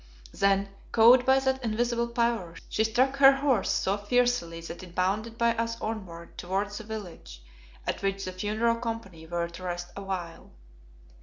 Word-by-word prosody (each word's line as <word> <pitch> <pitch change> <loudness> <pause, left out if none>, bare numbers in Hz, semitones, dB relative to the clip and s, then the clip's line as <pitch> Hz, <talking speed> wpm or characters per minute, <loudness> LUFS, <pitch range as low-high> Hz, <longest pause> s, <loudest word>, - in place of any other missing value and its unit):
Then, 195 0 +2 0.2
cowed 245 +3 +6
by 265 0 +6
that 265 -1 0
invisible 235 +1 0
power, 235 -7 -1
she 220 - +1
struck 255 +5 +2
her 275 0 +8
horse 270 -7 +1
so 195 +2 +1
fiercely 205 -5 +1
that 170 +2 -8
it 180 -1 -12
bounded 210 +5 -1
by 235 0 +2
us 230 0 -2
onward 185 -7 -6
towards 200 +3 -2
the - - -8
village, 185 - -8 0.5
at - - -2
which 195 0 -1
the 185 - -4
funeral 215 +5 0
company 225 -9 -6
were 170 0 -1
to 170 +2 -11
rest 175 -1 -4
awhile. 185 -4 -5
210 Hz, 160 wpm, -28 LUFS, 185-235 Hz, 0.5 s, her